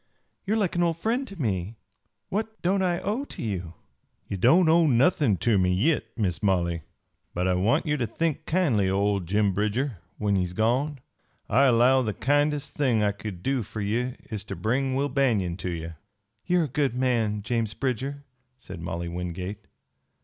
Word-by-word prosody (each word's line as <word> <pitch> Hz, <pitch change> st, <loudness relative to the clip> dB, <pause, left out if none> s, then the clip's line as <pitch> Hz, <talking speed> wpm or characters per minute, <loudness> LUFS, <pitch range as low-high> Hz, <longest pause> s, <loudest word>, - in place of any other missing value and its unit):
You 215 Hz, -, +2 dB
are -, -, +1 dB
like 195 Hz, -6 st, 0 dB
an 175 Hz, -, +1 dB
old 170 Hz, -2 st, +1 dB
friend 240 Hz, +9 st, -1 dB
to 195 Hz, -5 st, -11 dB
me. 105 Hz, -, -2 dB, 0.5 s
What 220 Hz, +2 st, -3 dB
don't 190 Hz, +2 st, +2 dB
I 180 Hz, -2 st, +1 dB
owe 215 Hz, +7 st, -1 dB
to -, -, -8 dB
you?" 90 Hz, -6 st, -4 dB, 0.5 s
"Ye -, -, -3 dB
don't 160 Hz, -, +5 dB
owe 165 Hz, 0 st, +5 dB
nothin' 130 Hz, -, +3 dB
ter 110 Hz, -1 st, +2 dB
me 90 Hz, 0 st, +2 dB
yit, 145 Hz, -, +1 dB
Miss 95 Hz, -5 st, -1 dB
Molly. 85 Hz, -4 st, +1 dB, 0.5 s
But 90 Hz, +2 st, 0 dB
I 95 Hz, -, +3 dB
want 105 Hz, -, +2 dB
ye 150 Hz, -1 st, +1 dB
ter 120 Hz, -4 st, -1 dB
think 155 Hz, +6 st, -2 dB
kindly 135 Hz, -, +2 dB
o' 95 Hz, -, +1 dB
old 100 Hz, -3 st, 0 dB
Jim 100 Hz, +1 st, +2 dB
Bridger 105 Hz, -, -1 dB, 0.2 s
when 105 Hz, -1 st, +1 dB
he's 90 Hz, -2 st, -1 dB
gone. 125 Hz, +7 st, 0 dB, 0.5 s
I 135 Hz, +5 st, +4 dB
allow 130 Hz, +1 st, +5 dB
the 110 Hz, -4 st, -2 dB
kindest 145 Hz, +1 st, +1 dB
thing 125 Hz, -7 st, +2 dB
I 105 Hz, -, +3 dB
kin 100 Hz, -3 st, -8 dB
do 135 Hz, -1 st, +1 dB
fer 110 Hz, +1 st, -7 dB
ye 120 Hz, +5 st, -1 dB, 0.2 s
is 105 Hz, -2 st, -4 dB
ter 100 Hz, -2 st, -6 dB
bring 130 Hz, +8 st, 0 dB
Will 140 Hz, +2 st, +1 dB
Banion 120 Hz, -11 st, +1 dB
ter 90 Hz, 0 st, -4 dB
ye." 85 Hz, -1 st, -4 dB, 0.6 s
"You 180 Hz, 0 st, +3 dB
are -, -, +2 dB
a -, -, -1 dB
good 135 Hz, -2 st, 0 dB
man, 115 Hz, -5 st, 0 dB
James 115 Hz, -1 st, -1 dB
Bridger," 135 Hz, +2 st, -2 dB, 0.3 s
said 95 Hz, -8 st, -10 dB
Molly 85 Hz, +1 st, -4 dB
Wingate. 90 Hz, +4 st, -5 dB
115 Hz, 190 wpm, -26 LUFS, 100-145 Hz, 0.6 s, don't